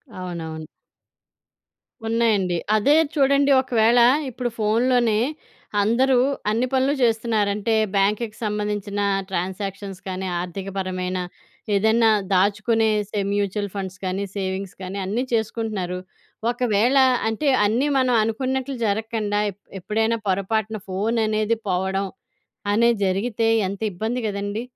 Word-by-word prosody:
అవును, 180 -2 -5
అవును. 160 -1 -7 1.4
ఉన్నాయండి. 215 -6 +1 0.2
అదే 280 +8 +4 0.2
చూడండి 280 -1 +3
ఒకవేళ 240 -2 +3 0.3
ఇప్పుడు 250 0 -3
ఫోన్‌లోనే 230 +1 +2 0.6
అందరూ 250 +4 +3 0.3
అన్ని 230 +4 +1
పనులు 265 +2 +2
చేస్తున్నారంటే 220 -2 +1 0.2
బ్యాంక్‌కి 210 +3 +1
సంబంధించిన 210 -1 -2 0.3
ట్రాన్సాక్షన్స్ 195 +1 -4
కానీ 190 0 -3
ఆర్థికపరమైన 185 0 -4 0.6
ఏదైనా 220 +3 +4 0.2
దాచుకునే 215 +4 +2 0.2
సే 210 - -2
మ్యూచువల్ 205 0 -1
ఫండ్స్ 190 -2 -5
కానీ 190 +1 -2
సేవింగ్స్ 190 -1 -3
కానీ 185 +1 -5
అన్నీ 215 +6 -1
చేసుకుంటున్నారు. 215 -5 -2 0.5
ఒకవేళ 245 +1 +2 0.3
అంటే 225 +7 -1 0.2
అన్నీ 235 +7 +1
మనం 255 -2 +2
అనుకున్నట్లు 260 +4 -2
జరగకుండా 215 0 -1
ఎప్ 200 +2 -23 0.2
ఎప్పుడైనా 220 +4 0
పొరపాటున 215 +3 0
ఫోన్ 210 +5 -1
అనేది 215 +1 +1
పోవడం 190 +1 0 0.7
అనేది 235 +1 +3
జరిగితే 215 +4 0 0.2
ఎంత 200 +2 -6
ఇబ్బంది 220 +7 -2
గదండీ! 205 +1 -3
210 Hz, 105 wpm, -23 LUFS, 195-230 Hz, 1.4 s, అదే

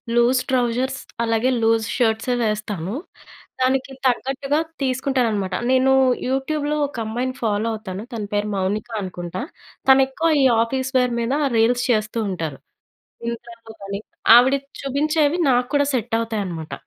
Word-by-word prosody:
Loose 240 +2 +4
trousers 255 +1 0 0.2
అలాగే 225 +2 +1
loose 225 0 +2
షర్ట్సే 235 0 +1
వేస్తాను. 210 -4 -2 0.7
దానికి 260 +1 +1
తగ్గట్టుగా 270 +3 0 0.2
తీసుకుంటాననమాట. 250 -7 0 0.2
నేను 260 +1 +4 0.4
యూట్యూబ్‌లో 290 +3 -1
ఒక 280 - -11
అమ్మాయిని 245 +4 -2
ఫాలో 215 0 0
అవుతాను. 205 -2 -6
తన 220 -2 -3
పేరు 205 +1 0
మౌనిక 195 +4 -2
అనుకుంటా. 180 -1 -5 0.5
తను 265 0 +8
ఎక్కువ 320 +5 0
ఈ - - +5 0.2
ఆఫీస్ 260 +2 -3
వేర్ 250 -1 +2
మీద 235 +3 -1 0.2
రీల్స్ 240 +2 +3
చేస్తూ 215 0 0
ఉంటారు. 160 -7 -4 0.7
ఇంస్టాలో 235 -1 -9
గాని 200 0 -5 0.4
ఆవిడ 255 +3 +6 0.3
చూపించేవి 295 +3 +1
నాకు 245 -1 +2
కూడా 285 0 +4
సెట్ 235 -2 -1
అవుతాయనమాట. 195 -8 -4
235 Hz, 130 wpm, -22 LUFS, 215-265 Hz, 0.7 s, తను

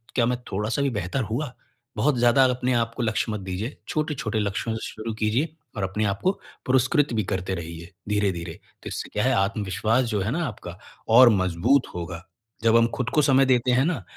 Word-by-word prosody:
क्या 120 - +3
मैं 125 +1 0
थोड़ा-सा 105 +8 -1
भी 140 - +2
बेहतर 105 +2 -2
हुआ? 125 +3 -3 0.4
बहुत 145 -3 +2
ज़्यादा 120 +2 +5
अपने 125 0 +1
आपको 115 +1 -1
लक्ष्य 110 0 0
मत 105 - -3
दीजिए। 95 +7 -5
छोटे-छोटे 135 -8 -2
लक्ष्यों 105 +2 -2
से 110 - -5
शुरू 110 +1 -5
कीजिए 115 +9 -1 0.2
और 100 - -2
अपने 100 +3 -1
आपको 100 - +1 0.3
पुरस्कृत 130 +3 +2
भी 110 -2 +1
करते 95 0 -2
रहिए, 85 0 -8 0.2
धीरे-धीरे। 95 -5 -1 0.3
तो - - -7
इससे - - -5
क्या - - 0
है, - - +3
आत्मविश्वास 105 +4 +1
जो 105 -4 -1
है 105 +5 -1
ना 165 +3 -1
आपका, 90 -6 -8 0.3
और 120 +2 +8
मज़बूत 95 +6 +2
होगा। 85 0 -5 0.4
जब 115 0 +5
हम 115 0 +4
खुद 125 -1 -2
को 150 - +5
समय 135 -1 +4
देते 125 -1 +2
हैं 130 +3 +3
ना, 160 - -1
115 Hz, 195 wpm, -25 LUFS, 100-130 Hz, 0.4 s, और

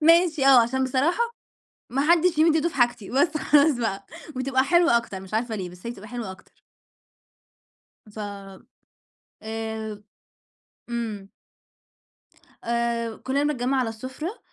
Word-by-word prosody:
ماشي، 330 -5 +5
آه، 260 -3 +8
عشان 265 +3 0
بصراحة 280 - +1 0.7
ما 270 +3 0
حدّش 345 -1 +3
يمِد 320 0 +5
إيده 320 +2 +2
في - - -13
حاجتي، 240 -5 +1
بس 300 +4 +2
خلاص 295 0 +4
بقى، 200 -4 -2 0.3
وتبقى 260 0 +1
حلوة 340 -4 +4
أكتر، 220 -5 -5
مش 190 +1 -12
عارفة 225 +1 -1
ليه، 185 -3 -4
بس 180 +4 -15
هي - - -2
بتبقى 210 -2 -11
حلوة 235 -6 -5
أكتر. 190 - -17 1.5
ف 210 +1 -13 1.2
آآ 220 -1 -5 0.9
إمم. 220 -4 -4 1.4
آآ 235 -1 -1
كُلّنا 275 +2 -1
بنتجمَّع 270 -2 0
على 245 - 0
السُفرة 260 - -6
245 Hz, 130 wpm, -25 LUFS, 220-290 Hz, 1.5 s, آه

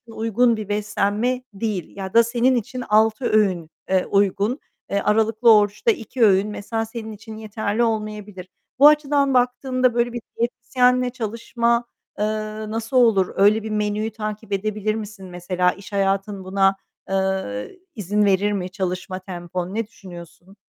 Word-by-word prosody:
uygun 230 +1 +2
bir 210 -1 -6
beslenme 210 +4 0
değil 195 -5 -4
ya 190 -1 -6
da 230 0 +7
senin 245 +2 +2
için 250 +2 -3
6 220 +4 +3
öğün, 185 -8 +1 0.2
eee, 190 -1 +2
uygun. 205 +6 +1 0.3
Eee, 200 - +1
aralıklı 220 +2 +4
oruçta 210 +2 +2
2 230 +3 -2
öğün 195 0 +4
mesela 225 +2 -3
senin 220 -1 -7
için 220 +1 -10
yeterli 215 +1 -2
olmayabilir. 210 -4 -3 0.3
Bu 290 - +9
açıdan 290 -2 +3
baktığında 255 0 +1
böyle 240 0 0
bir 240 - -4 0.2
diyetisyenle 250 +1 +1
çalışma, 235 0 -1 0.3
eee, 210 - +2 0.4
nasıl 225 +3 -2
olur? 220 -7 +4
Öyle 210 +2 +4
bir 220 - -5
menüyü 210 +1 -1
takip 215 0 -6
edebilir 215 +1 -1
misin? 210 -3 -7
Mesela 180 0 0
iş 200 +2 -12
hayatın 195 0 0
buna, 195 +1 +2 0.3
eee, 195 - -2 0.2
izin 210 0 0
verir 200 +1 +2
mi 185 -3 -2
çalışma 185 0 -4
tempon? 180 0 -6
Ne 225 -1 -1
düşünüyorsun? 175 -2 -13
215 Hz, 145 wpm, -22 LUFS, 195-235 Hz, 0.4 s, Bu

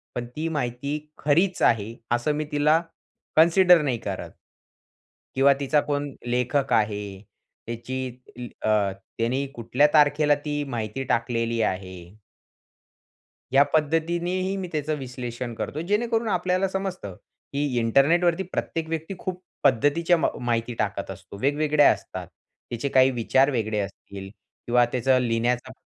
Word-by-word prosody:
पण 120 - -3
ती 160 +2 -2
माहिती 140 0 -2 0.2
खरीच 175 +6 +1
आहे 115 0 +2 0.2
असं 120 +5 0
मी 155 0 -2
तिला 150 +2 +3 0.6
कन्सिडर 175 +1 +6
नाही 130 -5 0
करत 100 -4 -5 1.0
किंवा 140 +1 +5
तिचा 145 +1 +2
कोण 145 0 -1 0.2
लेखक 125 +3 0
आहे? 105 -1 +1 0.7
त्याची 130 +3 -4 0.2
ती 120 -1 -9
अ, - - 0 0.5
त्यांनी 125 +4 0
कुठल्या 120 +5 +2
तारखेला 150 0 +4
ती 145 0 -1
माहिती 115 +2 -3
टाकलेली 115 -1 0
आहे? 95 -3 -2 1.6
या 140 +1 +7
पद्धतीनेही 170 +5 0
मी 185 -2 -4
त्याचं 155 -1 -1
विश्लेषण 125 -2 -6
करतो, 150 +6 -4
जेणेकरून 225 +5 0
आपल्याला 185 +1 +1
समजतं 190 - -4 0.4
की 145 +1 0
इंटरनेटवरती 165 +10 +3
प्रत्येक 165 -1 -3
व्यक्ती 165 +3 -3
खूप 185 -1 -5 0.2
पद्धतीच्या 145 +7 +3
म 160 - +1 0.2
माहिती 115 0 -1
टाकत 100 -2 -2
असतो. 95 +1 -11
वेगवेगळ्या 150 +1 +4
असतात. - - -6 0.4
त्याचे 120 +4 -3
काही 130 0 +5
विचार 130 +3 +2
वेगळे 110 -3 -1
असतील 100 0 -7 0.4
किंवा 120 0 +4
त्याचं 130 +1 +2
लिहिण्याचा 120 +2 0
135 Hz, 130 wpm, -25 LUFS, 120-160 Hz, 1.6 s, या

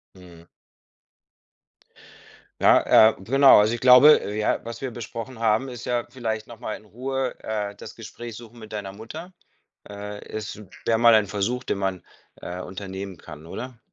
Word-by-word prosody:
Mhm. 85 -3 -15 2.2
Ja, 110 - +6
äh, - - -16
genau. 135 +4 +6
Also, 105 +2 +3
ich 120 - -3
glaube, 125 -1 +7
ja, 105 0 0
was 115 0 -7
wir 135 -2 -4
besprochen 115 +1 -7
haben, 115 +3 +1
ist 120 -2 -8
ja 120 -1 -1
vielleicht 110 -4 -4
noch 115 -2 -12
mal 115 -3 -4
in 110 - -14
Ruhe, 130 +4 -3
äh, 105 -2 -3
das - - -11
Gespräch 120 -2 -9
suchen 120 0 -13
mit 110 -1 -12
deiner 100 -2 -5
Mutter. 155 - -10 0.6
Äh, 105 0 -8
es 105 0 -7 0.2
wär 115 - +3
mal 115 0 +6
ein 110 -1 +4
Versuch, 105 +5 -2
den - - -2
man, 95 -2 -2 0.3
äh, 90 +1 -7
unternehmen 95 -1 -7
kann, 75 +2 -12
oder? 125 +7 -8
110 Hz, 165 wpm, -24 LUFS, 100-120 Hz, 2.2 s, glaube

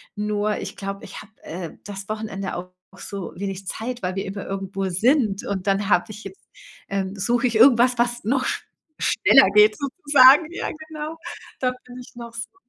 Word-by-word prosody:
Nur, 210 0 -1
ich - - -6
glaube, 195 0 -6
ich - - -9
habe, 210 +1 -16
äh, 170 0 -6
das 200 0 -8
Wochenende 215 -3 -4
auch 180 +1 -6 0.3
so 195 -3 -7
wenig 195 -1 -5
Zeit, 245 0 -5
weil 180 +1 -2
wir 195 - -3
immer 195 +1 -6
irgendwo 195 0 -3
sind. 215 - +1
Und 195 -1 -4
dann 195 0 +1
habe 175 +2 +3
ich 215 +1 -9
jetzt 385 - -12 0.4
ähm, 195 0 -2
suche 240 +6 +1
ich 230 - -3
irgendwas, 245 +1 +6
was 240 -2 -1
noch 255 +3 +1
sch - - -2 0.4
schneller 275 -10 +5
geht 210 0 +6
sozusagen. 285 0 +5
Ja, - - -4 0.2
genau. 310 +1 -6 0.4
Da 255 -1 +1
bin 250 0 -12
ich 245 - -12
noch 235 -1 -9
so 230 +10 -7
215 Hz, 185 wpm, -23 LUFS, 195-250 Hz, 0.4 s, irgendwas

